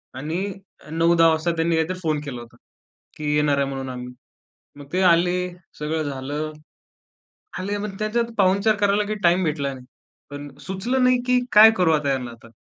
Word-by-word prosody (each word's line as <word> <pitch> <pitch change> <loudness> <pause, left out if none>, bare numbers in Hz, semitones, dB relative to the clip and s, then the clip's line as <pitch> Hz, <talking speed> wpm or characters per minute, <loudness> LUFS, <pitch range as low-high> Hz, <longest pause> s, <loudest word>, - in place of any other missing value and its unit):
आणि 155 +6 -4 0.5
अ, - - -14
9-10 165 0 +5
वाजता 160 +2 +1
त्यांनी 165 0 +1
काहीतरी 165 +3 -1
फोन 155 -2 0
केला 125 -4 -6
होता, 120 - -14 0.6
की 150 -1 -2
येणार 150 -1 +2
आहे 140 -1 +1
म्हणून 135 -1 -5
आम्ही. 125 0 -7 0.6
मग 145 - -10
ते 185 - +1
आले, 175 0 +4 0.4
सगळं 155 +1 -2
झालं. 145 +2 -4 1.1
आले 200 +2 -3
मग 200 -1 -5
त्याच्यात 230 +2 -1
पाहुणचार 200 +3 +3
करायला 205 +1 +2
काही 215 0 -3
टाईम 175 +1 +3
भेटला 145 -3 -1
नाही. 130 -1 -12 0.5
पण 145 0 -7 0.2
सुचलं 235 +8 -1
नाही, 255 0 +4
की 250 0 +3
काय 215 +1 +9
करू 170 -3 +3
आता 145 -2 +1
यांना 125 -2 -3
आता. 115 0 -14
165 Hz, 175 wpm, -23 LUFS, 145-195 Hz, 1.1 s, काय